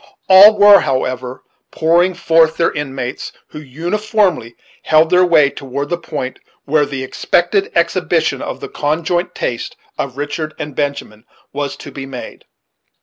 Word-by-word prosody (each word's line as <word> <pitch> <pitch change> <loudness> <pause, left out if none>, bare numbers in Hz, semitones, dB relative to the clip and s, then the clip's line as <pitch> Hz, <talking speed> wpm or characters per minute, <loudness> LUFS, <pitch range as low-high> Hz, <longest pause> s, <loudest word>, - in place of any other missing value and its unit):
All 200 +3 +8
were, 205 0 +8
however, 130 -2 -3 0.3
pouring 175 +3 +1
forth 165 -1 +2
their 165 - +2
inmates, 135 -4 -5 0.2
who - - -9
uniformly 175 - -1 0.3
held 155 +1 +3
their 180 0 +5
way 155 -5 +4
toward 140 +2 -6
the 175 - -1
point 140 -6 -6 0.3
where 145 0 +1
the 135 -2 -5
expected 400 - 0
exhibition - - 0
of - - -6
the - - -6
conjoint 165 +4 -2
taste 120 - -4 0.2
of 135 -1 -4
Richard 155 +2 -4
and 145 -2 -7
Benjamin 140 -7 -4 0.3
was 145 0 -3
to 145 - -11
be 135 0 -8
made. 130 -2 -9
150 Hz, 145 wpm, -16 LUFS, 135-175 Hz, 0.3 s, All